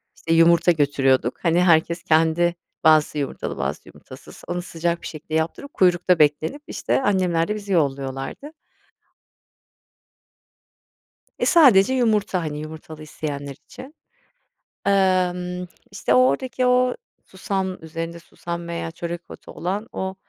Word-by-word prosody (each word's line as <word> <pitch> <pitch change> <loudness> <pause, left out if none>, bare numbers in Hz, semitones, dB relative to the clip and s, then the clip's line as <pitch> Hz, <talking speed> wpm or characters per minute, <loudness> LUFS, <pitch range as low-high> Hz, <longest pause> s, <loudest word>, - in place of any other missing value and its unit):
İşte, 165 - -2
yumurta 170 +1 +5
götürüyorduk, 135 -5 +1
hani, 170 0 +3
herkes 170 0 +2
kendi 165 +2 +2 0.3
bazısı 155 -1 +4
yumurtalı 140 -2 -4
bazısı, - - -4
yumurtasız, - - -14
onu 175 0 -3
sıcak 170 -1 -3
bir - - -7
şekilde 155 0 -9
yaptırıp 160 - -2
kuyrukta 180 -1 +3
beklenip, 155 - +1
işte, - - -1
annemler 180 -7 +1
de 210 - -2
bizi 205 -2 -7
yolluyorlardı. 135 - -2 2.9
Eee, - - 0
sadece 260 - +6
yumurta, 215 -7 +1
hani, 150 -2 -4
yumurtalı 155 0 -9
isteyenler 145 -2 -6
için. 265 +4 -12 0.9
Imm, 180 -2 +1 0.2
işte, 125 - -1
o - - +5
oradaki 250 - -1
o 250 0 +3 0.3
susam 190 -1 -3
üzerinde 165 +1 -6
susam 170 0 -7
veya 170 -1 -4
çörek 170 +1 -6
otu - - -12
olan, 200 +6 -4
o 190 0 -4
170 Hz, 125 wpm, -22 LUFS, 155-190 Hz, 2.9 s, sadece